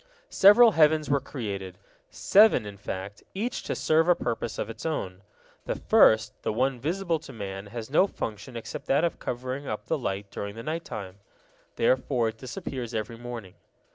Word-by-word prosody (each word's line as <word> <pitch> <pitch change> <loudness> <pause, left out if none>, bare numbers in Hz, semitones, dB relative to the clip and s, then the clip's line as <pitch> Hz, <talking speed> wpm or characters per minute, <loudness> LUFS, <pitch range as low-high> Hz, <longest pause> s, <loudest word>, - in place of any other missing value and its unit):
Several 220 +4 +7
heavens 155 -4 +3
were 140 - +4
created, 100 -9 -6 0.3
seven 205 - +5
in 100 -1 -7
fact, 100 0 -6
each 235 +6 -2
to - - -3
serve 160 +1 +2
a 175 - +6
purpose 115 -4 -3
of - - -2
its 115 -1 -9
own. 95 - -3 0.5
The - - -1
first, - - +4
the - - -1
one 130 +3 0
visible 170 +4 -1
to 150 - -11
man, 100 -3 -6
has 115 +3 -7
no 185 +6 +5
function 115 - -6
except 115 - -7
that 140 +4 +3
of 170 - -1
covering 130 +3 -4
up 105 0 -4
the 160 - -1
light 100 -4 -4
during 100 0 -5
the 115 - -7
night 160 +2 -3
time; 100 -2 -7 0.6
therefore 125 -1 +2
it 110 0 -10
disappears 130 -4 -6
every 110 +1 -3
morning. 120 -6 -7
120 Hz, 175 wpm, -27 LUFS, 105-155 Hz, 0.6 s, Several